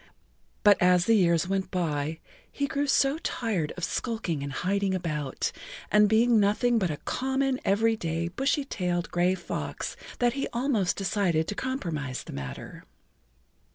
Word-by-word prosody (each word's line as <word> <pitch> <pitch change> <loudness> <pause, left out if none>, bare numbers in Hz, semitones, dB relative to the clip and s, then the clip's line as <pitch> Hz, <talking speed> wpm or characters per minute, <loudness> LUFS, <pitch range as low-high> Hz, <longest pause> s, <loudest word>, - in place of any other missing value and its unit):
But 205 -1 +6
as 180 0 +5
the 230 - +4
years 170 -5 +3
went 190 -1 -1
by 160 -4 -1 0.3
he 285 - -1
grew 280 +1 -1
so 275 +2 +3
tired 210 - -2
of 180 - -6
skulking 220 - -2
and 140 0 -4
hiding[Pg 195 +6 0
7] - - +1
about, 150 -6 -2 0.4
and 210 0 +5
being 225 +1 +4
nothing 225 +4 +3
but 185 -4 0
a 150 - -3
common, 265 - -1
every 225 +3 +2
day, 165 -2 -2
bushy 270 - 0
tailed 180 -7 -2
gray 180 +1 +2
fox - - -5 0.2
that 240 -1 +2
he 275 +1 -2
almost 235 -7 +1
decided 185 -5 0
to - - -1
compromise 165 - -3
the - - -9
matter. 70 -2 -7
195 Hz, 155 wpm, -27 LUFS, 170-235 Hz, 0.4 s, But